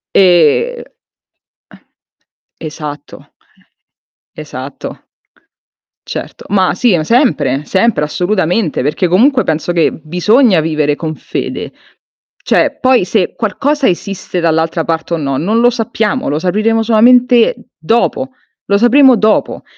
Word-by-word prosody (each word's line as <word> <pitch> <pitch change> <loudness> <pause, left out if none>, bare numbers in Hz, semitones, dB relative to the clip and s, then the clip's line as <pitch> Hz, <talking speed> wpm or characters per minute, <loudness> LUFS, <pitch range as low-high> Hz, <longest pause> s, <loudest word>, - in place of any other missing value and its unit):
E 185 - +3
Eh. - - -21 1.8
Esatto. 150 -2 -9 1.0
Esatto. 140 -3 -8 1.1
Certo. - - -7
Ma 190 -2 +1
sì, 215 +1 +2
ma 155 - -2
sempre, 155 - +1
sempre 200 -1 +1
assolutamente, 180 +2 -1
perché 150 +7 -1
comunque 250 - +3
penso 160 +2 -2
che 170 -2 +2
bisogna 185 - +2
vivere 155 -2 0
con 160 0 -5
fede. - - -5 0.7
Cioè, - - +1
poi 255 -7 +2
se 190 -1 -1
qualcosa 270 +7 -1
esiste 190 0 -3
dall'altra 165 0 0
parte 165 +1 -3
o - - -3
no, 140 -3 -2
non 215 +10 0
lo 240 - +4
sappiamo, 225 0 -2
lo 150 - -1
sapremo 215 +6 0
solamente 240 +2 +4 0.2
dopo. 235 +9 -1 0.4
Lo 200 - +3
sapremo 255 +3 +5
dopo. 215 0 0
185 Hz, 115 wpm, -13 LUFS, 160-235 Hz, 1.8 s, sapremo